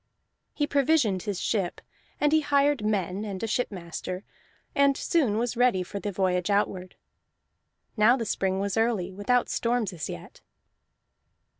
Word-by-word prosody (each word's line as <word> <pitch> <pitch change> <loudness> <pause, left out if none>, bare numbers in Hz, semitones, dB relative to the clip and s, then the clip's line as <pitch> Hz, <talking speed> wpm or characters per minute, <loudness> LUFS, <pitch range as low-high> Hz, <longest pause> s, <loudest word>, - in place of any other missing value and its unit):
He 295 - +1
provisioned 280 - +2
his 200 -2 -3
ship, 195 -6 -1 0.4
and 295 0 +3
he 315 - +5
hired 285 -3 +2
men 200 -2 -1
and 200 -1 -5
a - - +2
shipmaster, 185 -4 -3 0.5
and 280 -1 +3
soon 260 -11 +1
was 240 +1 -1
ready 235 -6 +3
for 200 +3 -6
the 205 - -3
voyage 180 -1 0
outward. 195 -2 0 1.0
Now 230 +3 +5
the 230 - -3
spring 190 -2 0
was 200 +1 -2
early, 225 -5 +1
without 240 +6 +1
storms 230 -4 0
as 165 -4 -5
yet. 85 - -9
210 Hz, 145 wpm, -27 LUFS, 190-245 Hz, 1.0 s, he